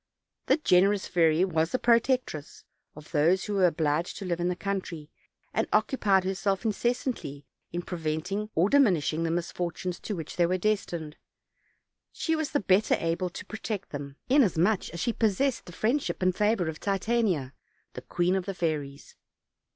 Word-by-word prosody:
The 270 - +4
generous 195 - +3
fairy 165 0 +3
was 160 -2 0
the - - +1
protectress 235 - +1 0.3
of 150 0 -13
those 165 +4 +3
who 210 - -3
were 190 -2 +4
obliged 155 0 -1
to 200 - -6
live 175 -2 -1
in 175 - 0
the 180 - 0
country, 175 -5 -4 0.4
and - - 0
occupied 200 -8 +2
herself 195 +2 -1
in 220 - +3
cessantly 230 - -2 0.3
in 175 +1 -3
preventing 175 +5 -3
or 170 +4 +4
diminishing 185 - +3
the 165 - 0
misfortunes 175 +1 -3
to 210 - -4
which 160 -3 -7
they 175 -1 +4
were 185 +1 +1
destined. 175 -6 -2 0.9
She 320 - -1
was 315 -2 -2
the 290 - +1
better 195 +2 +3
able 165 +2 -1
to - - -9
protect 215 -2 -5
them, 140 -1 -6
inasmuch 215 - +3
as 170 - -7
she 235 - 0
possessed 230 +5 +1
the - - -8
friendship 230 - -1
and 185 -1 +2
favor 210 -4 +1
of 160 -1 -5
Titania, 195 - 0 0.4
the - - -7
queen 180 +1 0
of 190 0 -2
the 195 - -3
fairies. 150 -5 -3
185 Hz, 165 wpm, -28 LUFS, 165-215 Hz, 0.9 s, The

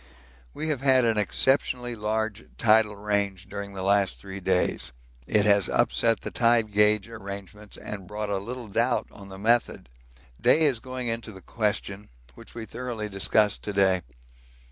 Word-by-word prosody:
We 155 - -3
have 145 -4 -1
had 130 -2 +5
an 110 -2 +2
exceptionally 125 +2 +1
large 110 0 -2
tidal 110 -2 +4
range 100 -2 -2
during 100 0 -6
the 95 -1 -5
last 100 0 +2
three 100 0 -8
days 90 -8 0 0.4
it 105 -1 +2
has 100 -2 +4
upset 115 -1 +2
the - - -6
tide 115 -2 +3
gauge 105 0 +3
arrangements 105 -1 -9
and 100 -3 -7
brought 105 +1 -4
a 100 - 0
little 120 +4 -6
doubt 120 +5 +1
on 100 -1 -12
the 95 - -9
method. 115 - +1 0.5
Day 160 - +4
is 135 -7 +2
going 130 0 -5
into 115 -1 -3
the 95 - -11
question, 105 -2 -2 0.2
which - - -14
we 115 -1 -6
thoroughly 115 -2 -5
discussed 105 +1 +1
to 105 - -4
day. 95 -2 +3
105 Hz, 165 wpm, -26 LUFS, 100-115 Hz, 0.5 s, had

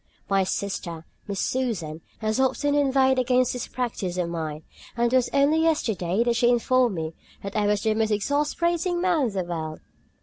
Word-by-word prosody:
My 195 -1 +2
sister, 180 -4 -4 0.2
Miss 200 -2 -3
Susan, 185 -12 -2 0.2
has 215 +2 0
often 275 +2 +1
inveighed 265 -2 +3
against 255 0 +2
this 250 - -4
practice 215 -8 -3
of 175 -2 -1
mine, 160 -2 -4 0.3
and 235 +1 +1
it - - +5
was 255 -2 +3
only 285 +3 +3
yesterday 220 - +1
that 240 -1 +1
she 240 0 +4
informed 245 -2 +2
me 160 -1 -4 0.3
that 200 0 -6
I 210 -1 +2
was 205 0 +1
the 220 -1 +2
most 220 0 +1
exasperating 325 - 0
man 345 -7 +2
in 215 - -5
the 190 -2 -1
world. 160 -3 -5
235 Hz, 180 wpm, -25 LUFS, 185-265 Hz, 0.3 s, it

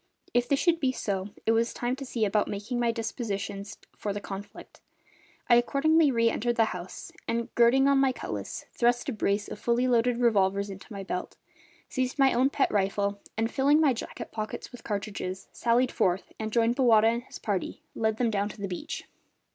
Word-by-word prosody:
If 245 0 +2
this 280 - +3
should 340 -2 +3
be 265 -4 +2
so 195 -5 -3 0.2
it 225 - +4
was 230 +1 +1
time 245 +1 -1
to 275 - -6
see 230 -3 0
about 210 +1 +1
making 210 +5 -3
my 235 -1 +2
dispositions 210 -3 -4 0.2
for 205 - -3
the 205 - -3
conflict; 200 0 -9 0.7
I - - +5
accordingly 295 +5 +3
re 230 -3 +3
entered 240 +2 0
the 225 -1 +4
house 180 0 -8 0.2
and, 235 +1 -2
girding 245 +3 +5
on 280 -1 +4
my 270 -1 +4
cutlass, - - -5
thrust 240 +4 +2
a - - -2
brace 205 -1 0
of - - -7
fully 240 +2 +1
loaded 245 0 +3
revolvers 200 -4 +2
into 195 +4 -11
my 200 -2 -5
belt, 180 -1 -4 0.5
seized 255 0 -2
my 270 -1 +5
own 255 +3 +3
pet 280 - +1
rifle 200 0 0 0.2
and, 225 +1 0
filling 285 +3 +4
my 295 -4 +4
jacket 230 - -7
pockets 215 -1 -5
with 245 -2 -11
cartridges, 200 -2 -4
sallied 240 +2 +2
forth 180 +1 0
and, 220 0 -3
joining 230 +1 +3
Bowata 235 -4 +5
and 235 +1 +1
his - - -10
party, 200 -4 -3
led 220 -1 0
them 235 -2 +1
down 205 0 0
to - - -11
the 200 - -3
beach. 185 - -5
230 Hz, 195 wpm, -28 LUFS, 205-250 Hz, 0.7 s, I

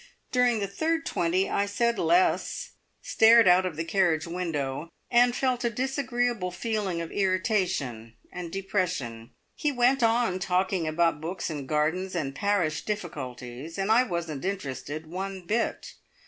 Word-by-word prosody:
During 250 -2 +3
the 205 - -1
third 320 +11 -1
twenty 175 +3 +1
I 200 - 0
said 235 +2 0
less, 175 +3 +1 0.3
stared 225 0 +6
out 180 +1 +5
of 170 - -5
the 160 - -2
carriage 165 -3 +1
window, 165 -4 -3 0.2
and 245 0 +5
felt 255 -2 0
a 235 - +2
disagreeable 245 -4 -1
feeling 195 -2 -2
of 165 - -6
irritation 185 - -1 0.2
and 175 -2 -6
depression. 180 - -2 0.2
He 295 - -1
went 255 +1 +3
on 230 -5 +2
talking 185 -2 0
about 160 -1 +1
books 170 +1 -4
and 140 -4 -6
gardens 160 +5 0
and 140 -5 -2
parish 175 -5 0
difficulties, 145 - -6
and 195 +2 0
I 230 +3 +6
wasn't 170 - -3
interested 155 -5 -4
one 190 +2 -5
bit. 225 +6 -1
185 Hz, 145 wpm, -27 LUFS, 160-220 Hz, 0.3 s, stared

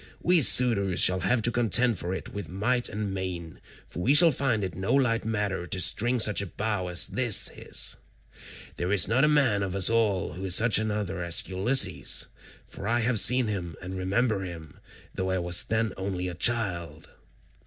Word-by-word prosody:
We 175 -1 +3
suitors 110 -9 +4
shall 90 0 +4
have 105 +6 -1
to 120 - 0
contend 120 -1 +1
for 90 - -5
it 95 - -7
with 100 -5 -7
might 120 +7 -1
and 105 -2 -5
main, 90 -4 -7 0.2
for - - -10
we 135 +9 +2
shall 165 +1 +7
find 125 -6 -2
it 95 -3 -5
no 95 - -2
light 120 -5 0
matter 105 -5 -3
to 95 - -1
string 120 +6 +3
such 105 -3 +3
a 100 - -6
bow 105 -1 -4
as 90 0 +2
this 120 -5 0
is. - - 0 0.8
There 90 +2 -3
is 100 -5 +5
not 120 +7 +1
a - - +4
man 135 -9 +1
of 95 -1 -4
us 100 +2 +2
all 110 -5 -1
who 90 - -9
is 95 -1 +2
such 115 0 +4
another 105 -5 -4
as 85 -1 +1
Ulysses; 100 +9 +1 0.4
for 100 - -10
I 120 +1 0
have 115 -1 0
seen 125 +3 +4
him 90 -6 -5
and 95 0 -8
remember 100 +3 -2
him, 85 -4 -11 0.3
though 95 0 -4
I 95 - -1
was 90 0 +1
then 110 -2 -3
only 95 -1 -5
a 90 - -6
child." 85 -7 -2
100 Hz, 195 wpm, -25 LUFS, 90-115 Hz, 0.8 s, shall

